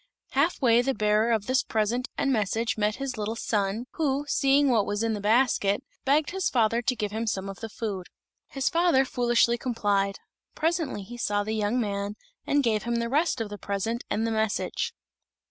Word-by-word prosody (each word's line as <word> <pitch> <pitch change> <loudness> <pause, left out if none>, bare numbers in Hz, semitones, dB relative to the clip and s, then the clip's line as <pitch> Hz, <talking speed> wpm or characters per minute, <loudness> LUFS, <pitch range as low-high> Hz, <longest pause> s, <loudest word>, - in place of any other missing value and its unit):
Half 285 +2 +1
way 235 -1 +5
the 265 +1 -1
bearer 215 +2 +2
of 220 -3 +1
this 255 +3 +2
present 225 +4 -1
and 275 -1 +1
message 225 +2 0
met 210 0 0
his 270 -4 -4
little 215 +2 -2
son, 210 0 -1
who, 290 -2 -1
seeing 280 0 +3
what 220 -4 +2
was 205 +2 -1
in 225 -1 +1
the 205 - -4
basket, 220 0 +2 0.2
begged 290 +3 +2
his 380 0 0
father 230 -1 +2
to 250 +2 0
give 210 -3 -3
him 225 +2 -3
some 195 -2 -2
of 195 0 -7
the 225 - -6
food. 205 -5 -4 0.4
His 270 -1 -2
father 335 -5 +3
foolishly 240 -1 +2
complied. 205 -6 0 0.4
Presently 320 - -1
he 240 +5 -9
saw 205 -3 0
the 215 +1 -3
young 215 +3 0
man, 200 -2 -2 0.3
and 285 0 +3
gave 220 -3 +1
him 235 0 -2
the 235 0 -1
rest 300 +1 +1
of 220 - -3
the 205 0 -8
present 220 +4 -2
and 220 +2 0
the 230 - -1
message. 220 -1 -1
230 Hz, 195 wpm, -27 LUFS, 210-260 Hz, 0.4 s, way